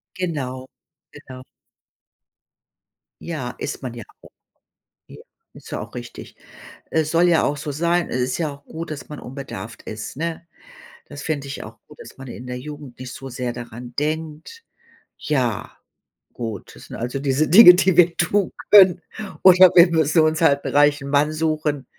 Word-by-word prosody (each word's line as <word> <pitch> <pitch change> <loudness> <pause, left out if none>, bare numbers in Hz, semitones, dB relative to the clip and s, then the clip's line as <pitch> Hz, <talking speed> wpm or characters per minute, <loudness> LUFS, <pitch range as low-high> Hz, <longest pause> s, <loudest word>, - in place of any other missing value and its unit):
Genau, 135 -8 -4 0.5
genau. 130 -3 -12 1.8
Ja, 150 -8 -5
ist - - -5
man 125 -3 -5
ja 120 -2 -9 0.2
auch. - - -16 0.8
Ja. - - -13 0.3
Ist - - -14
ja - - -4
auch - - -9
richtig. 120 -1 -10 0.5
Es 155 -1 0
soll 170 +1 +3
ja 165 - +3
auch 145 - -1
so 145 +1 -5
sein, 170 +4 0
es 125 - -2
ist 125 +3 -1
ja 155 -3 -2
auch 140 0 -15
gut, 165 0 -7
dass 150 - -7
man 150 - -8
unbedarft 130 -3 -9
ist, 110 +3 -7
ne? 170 +1 -4 0.6
Das - - -10
finde 145 -3 -3
ich 140 - -7
auch - - -12
gut, - - -17
dass - - -13
man 135 - -10
in 120 +1 -9
der 125 0 -5
Jugend 145 -2 -10
nicht 130 -1 -7
so 135 +1 -9
sehr 125 0 -4
daran 120 0 -9
denkt. 160 - -4 0.5
Ja, 125 -8 -2 0.6
gut, 115 -3 -7
das - - -14
sind - - -9
also, 125 +3 -4
diese 140 +2 0
Dinge, 180 0 +10
die 185 -1 +2
wir 170 -1 +5
tun 190 +2 +1 0.2
können. 185 -4 +7 0.4
Oder 185 0 +8
wir 170 0 +8
müssen 160 0 +3
uns 155 +1 +1
halt 140 -3 +3
'n - - -2
reichen 145 -1 +3
Mann 145 +2 +2
suchen, 155 -3 -2
145 Hz, 170 wpm, -21 LUFS, 130-165 Hz, 1.8 s, Dinge